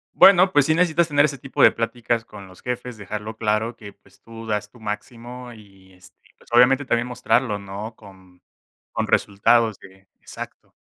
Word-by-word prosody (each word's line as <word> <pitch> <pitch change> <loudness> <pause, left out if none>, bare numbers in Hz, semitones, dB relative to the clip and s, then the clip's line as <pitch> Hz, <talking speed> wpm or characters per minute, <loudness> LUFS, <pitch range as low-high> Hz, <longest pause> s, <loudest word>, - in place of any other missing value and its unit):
Bueno, 190 -1 +7
pues 145 -4 +4
sí 155 - +3
necesitas 170 -1 +2
tener 145 -1 +4
ese 140 -2 -3
tipo 135 +2 -4
de - - +8
pláticas 115 0 -2
con 100 -3 -12
los 90 -1 -17
jefes, 125 -1 -5
dejarlo 105 +2 -7
claro 110 +2 -1
que, 100 -2 -11
pues 100 0 -26
tú 115 0 -11
das 105 -1 -2
tu 120 - -18
máximo 120 +3 -7
y, 95 -3 -18
este, 90 0 -19 0.2
pues - - -22
obviamente 125 +3 +5
también 120 0 0
mostrarlo, 125 -3 0
¿no? 100 +3 -8
Con 95 -4 -18 0.5
con - - -2
resultados 110 +1 +2
de 95 0 -17
Exacto, - - -11
115 Hz, 175 wpm, -22 LUFS, 100-125 Hz, 0.5 s, de